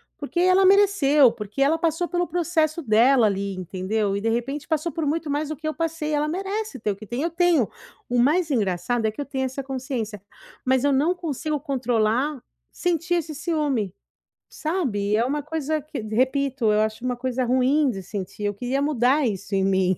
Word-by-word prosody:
porque 305 +4 -4
ela 370 +2 +5
mereceu, 370 - +5
porque 210 +1 -8
ela 320 +3 +2
passou 335 +1 0
pelo 355 0 -1
processo 335 -2 0
dela, 235 +2 +5
ali, 200 -1 -1
entendeu, 195 +3 -2
e 200 - -2
de 225 - 0
repente 270 +5 -2
passou 315 0 -1
por 320 -3 -2
muito 320 +1 -1
mais 295 +1 -1
do 310 - -3
que 310 +2 -6
eu 310 - -1
passei, 325 -2 -2
ela 295 +1 +1
merece 390 - -3
ter 210 -1 -1
o - - -4
que 210 +1 -12
tem", 245 - -3
eu 335 - -1
tenho 335 - +3 0.4
o 245 0 0
mais 305 +5 +3
engraçado 220 +1 0
é - - 0
que 220 - -15
eu 285 - -2
tenho 265 -1 -2
essa 265 +1 -4
consciência, 250 -6 -4 0.4
mas 260 0 +2
eu 285 -1 +3
não 315 +7 +2
consigo 305 -2 -3
controlar 255 0 0 0.3
sentir 350 0 0
esse 320 -2 -2
ciúme, 285 - -1 0.6
sabe, 265 - -2
e - - +4
é 230 - +2
uma 290 +2 -1
coisa 310 0 -2
que 300 -4 -6
repito, 250 +1 +1
eu 210 - +3
acho 220 +3 -2
uma 250 -1 -1
coisa 255 0 -1
ruim 260 +3 +3
de 195 -4 -5
sentir, 195 +1 -6
eu 205 0 0
queria 250 +6 -2
mudar 280 0 +2
isso 200 -1 -3
em 195 - +2
mim. 190 -1 +2
270 Hz, 200 wpm, -24 LUFS, 220-310 Hz, 0.6 s, ela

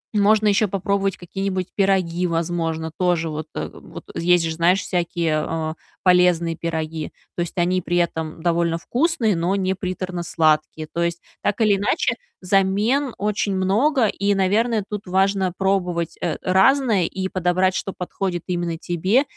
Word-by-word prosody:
можно 210 +1 +4
ещё 205 +1 +3
попробовать 195 0 -1
какие-нибудь 185 +1 -3
пироги, 185 -3 +1
возможно. 165 -1 -2
Тоже 175 -3 +1
вот 155 +1 -5
вот - - -7
есть 175 0 +3
же, 160 - -1
знаешь, 175 +4 +3
всякие, 170 -3 -1
э, 160 -1 -2 0.3
полезные 180 -2 +4
пироги. 160 -1 -4 0.2
То - - -2
есть 175 +2 -4
они 180 +1 +2
при 175 +1 -1
этом 160 -2 -2
довольно 170 -1 +1
вкусные, 245 - +1
но 175 +4 0
не 190 -1 0
приторно 185 -1 -4
сладкие. 155 -2 +1
То 170 - -1
есть, 170 0 -1 0.2
так 205 - -1
или 205 -2 +4
иначе, 205 +11 +1 0.3
замен 205 +8 +1
очень 205 -1 -1
много, 225 +8 +2
и, 200 0 +1
наверное, 210 +3 +2
тут 210 -1 -6
важно 190 0 +2
пробовать, 180 -4 0
э, 165 -4 -1
разное 200 +1 +3
и 190 +2 -3
подобрать, 185 0 +1
что 195 - -3
подходит 180 -1 -4
именно 175 -2 -2
тебе, 185 - +1
185 Hz, 150 wpm, -22 LUFS, 170-195 Hz, 0.3 s, можно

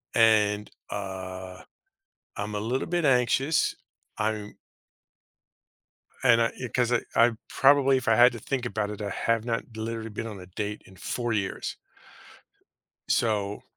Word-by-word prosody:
and, 105 -2 +4 0.2
uh, 95 -2 -6 0.8
I'm 105 +1 -4
a - - -2
little 125 +8 -2
bit 175 -2 0
anxious. 135 +3 +2 0.4
I'm 105 -1 -2 1.7
and 115 -2 +6
I 115 - +4 0.2
i - - -2
'cause 125 0 0
I 120 - +3
I 115 +1 +6 0.2
probably 135 -1 +5
if 125 - -5
I 110 - +5
had 120 +2 +7
to 115 - -7
think 125 +2 -2
about 105 -3 -2
it, 105 0 -6
I 100 - -2
have 115 +2 0
not 115 -1 -3
literally 115 0 -4
been 115 +2 -5
on 105 -3 -7
a 90 - -11
date 105 +3 -4
in 95 - -16
4 120 +3 -2
years. 100 -2 -2 1.3
So 105 -3 0
110 Hz, 150 wpm, -27 LUFS, 105-120 Hz, 1.7 s, had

